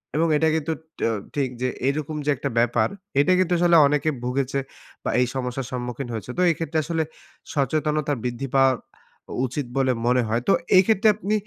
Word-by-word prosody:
এবং 165 +2 +2
এটা 160 - +2
কিন্তু 160 +1 -1 0.3
ট্যও 115 -1 +1 0.2
ঠিক 135 -3 0
যে 130 - +1 0.2
এইরকম 150 +2 -1
যে 150 - 0
একটা - - -3
ব্যাপার, 120 -1 +2 0.3
এটা 175 +6 +4
কিন্তু 180 -1 +2
আসলে 175 -1 +4
অনেকে 150 +2 +1
ভুগেছে 135 +2 -1 0.4
বা - - -2
এই - - +4
সমস্যার 125 0 -3
সম্মুখীন 125 +1 -4
হয়েছে। 110 +2 -6
তো - - +1
এই 165 - +2
ক্ষেত্রে 160 -1 -2
আসলে 165 -1 0 0.5
সচেতনতা 150 +1 0
বৃদ্ধি 125 +2 -3
পাওয়া 135 -1 +5 0.6
অ - - -6
উচিত 130 +2 -3
বলে 130 -1 +3 0.2
মনে 125 0 +3
হয়। 115 +2 0
তো 195 - +5 0.2
এই 185 - +8
ক্ষেত্রে 220 0 +3
আপনি 215 0 -2
140 Hz, 190 wpm, -24 LUFS, 125-160 Hz, 0.6 s, এই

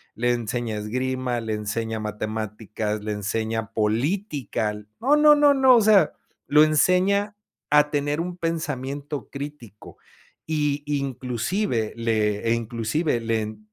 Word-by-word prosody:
Le 120 +2 +1
enseña 120 -1 -2
esgrima, 125 +3 -2
le 110 -1 -3
enseña 110 +1 -3
matemáticas, 110 0 -4
le 105 - -3
enseña 110 +2 -3
política, 120 - -1 0.3
no 275 +5 +4
no 300 0 +7
no 290 -1 +5
no, 265 -2 +6
o 230 - +5
sea, 205 -6 +5 0.3
lo 150 +1 +6
enseña 185 +6 +2 0.4
a 150 0 +5
tener 145 +1 -1
un 180 +1 -5
pensamiento 145 -3 -4
crítico 140 -7 -9 0.5
y 150 -2 -1
inclusive 130 - -2
le, 110 -1 0
eh, - - +4
inclusive 115 +5 -1
le 110 -2 -2
125 Hz, 120 wpm, -24 LUFS, 110-155 Hz, 0.5 s, no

